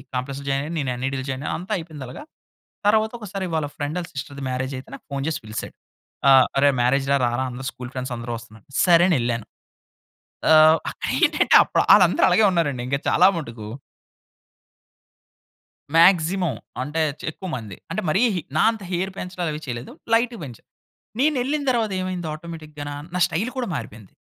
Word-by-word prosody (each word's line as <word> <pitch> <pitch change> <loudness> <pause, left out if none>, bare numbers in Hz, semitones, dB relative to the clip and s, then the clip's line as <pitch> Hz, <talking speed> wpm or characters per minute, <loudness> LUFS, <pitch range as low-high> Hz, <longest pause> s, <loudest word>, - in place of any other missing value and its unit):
కాంప్లెక్స్‌లో 135 +2 -4
జాయినయారు. 140 +5 -1
నేను 135 -3 -1
ఎన్‌ఐటీలో 130 +1 -3
జాయినయ్యా. 135 +2 -3
అంతా 180 - -9
అయిపోయిందలగా. 150 - -8 0.6
తరవాతొకసారి 215 -2 0
వాళ్ళ 155 - 0
ఫ్రెండాళ్ళ 160 +4 -3
సిస్టర్‌ది 140 0 -6
మ్యారేజయితే 130 +1 -4
నాకు - - -11
ఫోన్ 140 - -2
చేసి 160 - -1
పిలిశాడు. 110 0 -6 0.6
ఆహ్, 130 -2 +7
"అరేయ్! 140 0 +4
మ్యారేజ్ 135 +2 +2
రా, - - +5
రారా 120 +2 -1
అందరు 130 +2 -7
స్కూల్ 125 -1 -9
ఫ్రెండ్సందరూ 125 -2 -4
వస్తన్నారు." 110 -2 -16 0.2
సరే 175 -1 +6
అనెళ్ళాను. 120 -7 0 1.1
ఆహ్, 155 0 +8
అక్కడేంటంటే, - - +2
అప్పుడ - - -1
ఆళ్ళందరు - - +5
అలాగే 220 - +4
ఉన్నారండి 145 -8 0
ఇంక 140 - 0
చాలా - - +6
మటుకు. 115 -8 -7 2.3
మాగ్జిమం. 170 -2 +4 0.3
అంటే, 150 +4 -2 0.2
చె - - -7
ఎక్కువ 190 - -9
మంది. 105 -6 -9
అంటే, - - -1
మరీ 190 +7 +2
హ్ 175 - -1 0.2
నా - - +4
అంత 220 -2 -9
హెయిర్ 185 +2 -1
పెంచడాలవి 175 -4 -4
చెయ్యలేదు. 120 -1 -6 0.2
లైట్‌‌‌‌గ 235 0 +2
పెంచా. 125 -5 -10 0.6
నేనెళ్ళిన 285 +1 +1
తరవాతేమైంది 185 -7 -1
ఆటోమేటిక్‌గాన, 155 -2 -8 0.2
నా 180 - -1
స్టైలు 205 +11 -2
కూడా 250 -2 -1
మారిపోయింది. 110 -5 -8
150 Hz, 145 wpm, -23 LUFS, 130-180 Hz, 2.3 s, ఆహ్